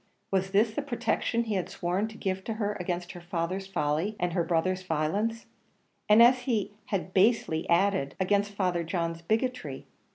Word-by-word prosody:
was 190 0 +1
this 210 +3 +3
the 295 - -1
protection 235 -3 0
he 220 -2 -3
had 185 -3 -1
sworn 180 +5 -1
to 220 0 -11
give 190 -1 -2
her 215 -2 -1
against 175 0 -3
her 175 - -10
father's 175 +2 -3
folly, 160 +3 -1
and 175 -1 0
her 170 - +1
brother's 180 +3 0
violence? 185 +8 -1 0.6
and, 215 +2 +8
as 250 +2 +6
he 235 -6 -1 0.2
had 185 -2 -3
basely 190 -5 +2
added, 185 -4 +2
against 205 +2 +1
Father 180 -4 0
John's 165 -1 -2
bigotry? 220 - -2
190 Hz, 165 wpm, -28 LUFS, 175-215 Hz, 0.6 s, and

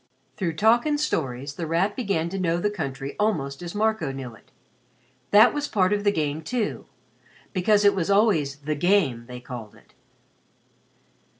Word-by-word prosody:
Through 175 -4 -2
talk 225 - +3
and 295 -1 +1
stories 140 - -2
The 165 +1 -5
Rat 180 +6 +1
began 195 -9 -1
to 195 +2 -4
know 170 -2 +1
the 205 +4 0
country 135 -7 -5
almost 155 -10 -1
as 175 +2 -7
Marco 215 -8 0
knew 135 -3 -7
it. 110 - -19 0.8
That 215 +3 +6
was 290 0 -2
part 195 -5 +2
of 205 0 -1
the 205 - +3
game 155 -4 -2
too 225 +5 -3 0.7
because 205 +2 +3
it 200 - +6
was 185 -3 -2
always 195 -9 +3
"the 150 +2 -4
game," 150 -7 +1
they 125 0 -8
called 120 -4 -9
it. - - -22
175 Hz, 170 wpm, -25 LUFS, 140-210 Hz, 0.8 s, That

